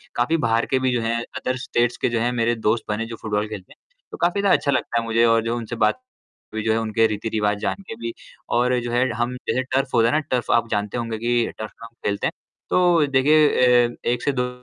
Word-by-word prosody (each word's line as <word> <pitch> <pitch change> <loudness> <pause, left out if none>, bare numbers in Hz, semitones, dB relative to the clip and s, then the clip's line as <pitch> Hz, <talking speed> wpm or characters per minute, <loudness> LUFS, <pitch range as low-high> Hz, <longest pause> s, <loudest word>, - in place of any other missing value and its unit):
काफ़ी 125 +8 +1
बाहर 115 +1 +2
के 130 - +4
भी 130 -1 +1
जो 120 - 0
हैं, 115 +1 0 0.2
अदर 130 0 -2
स्टेट्स 120 -2 0
के - - 0
जो - - +1
हैं 120 +2 +1
मेरे 120 0 +1
दोस्त 110 +1 0
बने, 110 +2 -1
जो 115 0 -7
फुटबॉल 105 -1 -1
खेलते 105 -4 -9
हैं, - - -33 0.3
तो - - -7
काफ़ी 180 +4 +1
ज़्यादा 200 - +4
अच्छा 140 - 0
लगता 120 -2 0
है 115 - -4
मुझे 115 +1 +3
और 115 -1 +3
जो 115 +1 -1
उनसे 120 0 -5
बात 255 - 0 0.5
हुई, 110 -1 -3
जो 110 - +2
है - - +1
उनके 110 0 +2
रीति-रिवाज़ 105 -1 -1
जानके 195 - -4
भी 115 0 -4 0.5
और 125 0 +2
जो 120 0 -4
है 125 +2 +2
हम 125 +1 -1
जैसे 130 - +1
टर्फ़ 135 +1 -1
होता 115 0 +4
है - - -1
ना, 155 - +3
टर्फ़ 130 -5 -2
आप 115 -1 +2
जानते 105 +2 -1
होंगे 115 -2 -3
कि 120 +1 0
टर्फ़ 110 -1 -6
पे - - -17
हम 115 - -14 0.2
खेलते 100 - -1
हैं, - - -2 0.4
तो 175 -4 +4
देखिए 145 +3 +4 0.4
अ, 120 - -9
1 120 0 0
से 145 - +2
2 125 -1 -1
120 Hz, 250 wpm, -22 LUFS, 115-130 Hz, 0.5 s, के